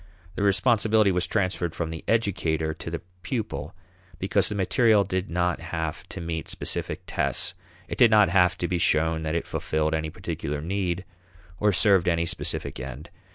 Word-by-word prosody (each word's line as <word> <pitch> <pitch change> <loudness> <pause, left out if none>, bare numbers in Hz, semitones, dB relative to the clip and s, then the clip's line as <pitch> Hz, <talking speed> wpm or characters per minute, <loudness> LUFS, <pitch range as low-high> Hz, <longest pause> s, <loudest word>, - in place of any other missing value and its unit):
The - - -4
responsibility 105 +1 +4
was 90 0 +1
transferred 95 -5 -1
from 80 -1 -3
the 80 - -6
educator 80 -8 +1
to 80 - -7
the 85 0 -5 0.2
pupil 90 - -4 0.4
because 95 +2 +1
the 105 - -3
material 100 +2 +4
did 95 0 -2
not 90 +1 0
have 80 -2 -4
to - - -6
meet 80 -3 -4
specific - - -3
tests; - - -1 0.3
it - - -6
did 120 -3 +8
not 105 -4 +6
have 90 0 +4
to 90 - -1
be 90 -1 -1
shown 80 0 +2
that 80 0 -2
it 85 - -1
fulfilled 80 0 -1
any 80 0 -1
particular 75 -1 -4
need 90 +2 -2 0.5
or 105 0 +3
served 95 -1 +4
any 85 -1 +2
specific 85 - -3
end. 70 +5 -7
90 Hz, 170 wpm, -26 LUFS, 80-100 Hz, 0.5 s, did